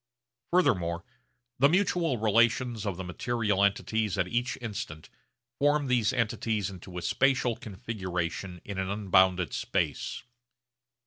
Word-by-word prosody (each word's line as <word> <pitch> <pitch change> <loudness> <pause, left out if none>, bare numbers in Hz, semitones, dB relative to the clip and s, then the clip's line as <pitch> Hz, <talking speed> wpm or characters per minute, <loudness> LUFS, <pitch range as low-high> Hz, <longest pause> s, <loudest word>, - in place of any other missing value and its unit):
Furthermore 85 - +2 0.6
the 140 +2 +6
mutual 175 -5 +2
relations 115 +1 +2
of 95 -4 -2
the 95 - -4
material 105 +2 0
entities 105 +1 +1
at 90 - +1
each 120 +5 -1
instant 105 -9 -6 0.5
formed 145 -1 +2
these 120 -4 +3
entities 110 -4 -1
into 90 -1 -10
a 90 - -4
spatial 130 -1 +2
configuration 95 -6 -4
in 100 -2 -5
an 95 0 -2
unbounded 95 -4 +3
space. - - -2
105 Hz, 120 wpm, -29 LUFS, 95-120 Hz, 0.6 s, the